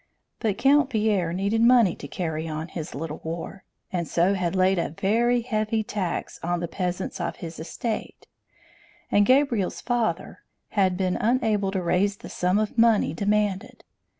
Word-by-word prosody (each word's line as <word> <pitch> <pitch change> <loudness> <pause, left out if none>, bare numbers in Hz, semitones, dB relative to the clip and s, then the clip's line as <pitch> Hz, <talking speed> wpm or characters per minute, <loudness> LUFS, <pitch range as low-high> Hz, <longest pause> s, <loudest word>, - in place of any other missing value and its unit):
But 210 -3 -1
Count 275 +3 +4
Pierre 210 -7 +1
needed 200 +5 0
money 235 -6 +5
to 140 - -8
carry 160 0 -3
on 155 +1 -4
his 160 -3 -6
little 155 +1 -5
war, 170 +4 -6 0.3
and 170 -3 -1
so 175 +4 +2
had 185 -2 -1
laid 185 0 +3
a - - -1
very 235 +8 +1
heavy 220 -2 -1
tax 205 -6 -3
on 175 +1 -1
the 170 - -3
peasants 180 +1 -3
of 170 - -2
his 165 -2 -8
estate; 215 +7 -5 0.9
and 205 0 +4
Gabriel's 255 -7 +2
father 240 -3 -1 0.3
had 190 -3 +1
been 185 -1 0
unable 220 -4 +1
to 190 -2 -1
raise 195 +4 +1
the - - -10
sum 180 +2 +1
of 215 +2 -1
money 225 -9 +4
demanded. 210 +4 -1
195 Hz, 160 wpm, -25 LUFS, 175-225 Hz, 0.9 s, money